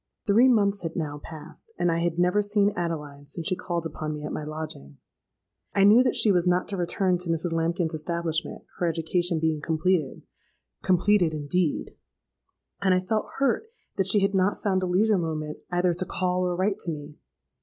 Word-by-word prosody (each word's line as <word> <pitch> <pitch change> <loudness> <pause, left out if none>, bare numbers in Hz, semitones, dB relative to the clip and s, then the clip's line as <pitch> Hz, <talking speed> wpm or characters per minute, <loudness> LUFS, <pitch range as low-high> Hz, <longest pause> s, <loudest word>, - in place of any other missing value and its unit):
"Three 225 +5 +5
months 205 -5 +3
had 165 -2 -5
now 150 -3 -3
passed; 160 - -11
and 175 - +2
I 165 - 0
had 170 -1 -1
never 180 +4 +3
seen 205 0 +2
Adeline 150 -5 -4
since 165 +3 -6
she 185 - +1
called 170 -2 -3
upon 155 -1 -4
me 150 - -7
at - - -4
my - - -4
lodging. 150 - -7 0.8
I 195 - +4
knew 210 +5 +7
that 255 -1 +1
she 215 - +4
was 180 -1 +2
not 180 +1 +2
to 200 - -2
return 180 +1 0
to 180 -1 -5
Mrs. 165 +1 -1
Lambkin's 165 0 0
establishment, 165 0 -3 0.2
her 175 - +1
education 170 +1 0
being 160 -1 0
completed 160 -2 0 0.6
(completed 180 -2 +3
indeed!); 155 +2 -1 0.9
and 190 -2 +3
I - - +3
felt 215 +4 -1
hurt 275 - +1 0.3
that 195 -2 +1
she 200 +1 +3
had 195 +1 +1
not 190 +1 +1
found 190 -2 +1
a 185 - -1
leisure 200 +3 +3
moment 155 -2 -3
either 175 0 +2
to 180 +2 -2
call 180 0 -1
or 175 - -1
write 195 +3 0
to 170 - -3
me. 150 -1 -8
175 Hz, 190 wpm, -26 LUFS, 160-195 Hz, 0.9 s, knew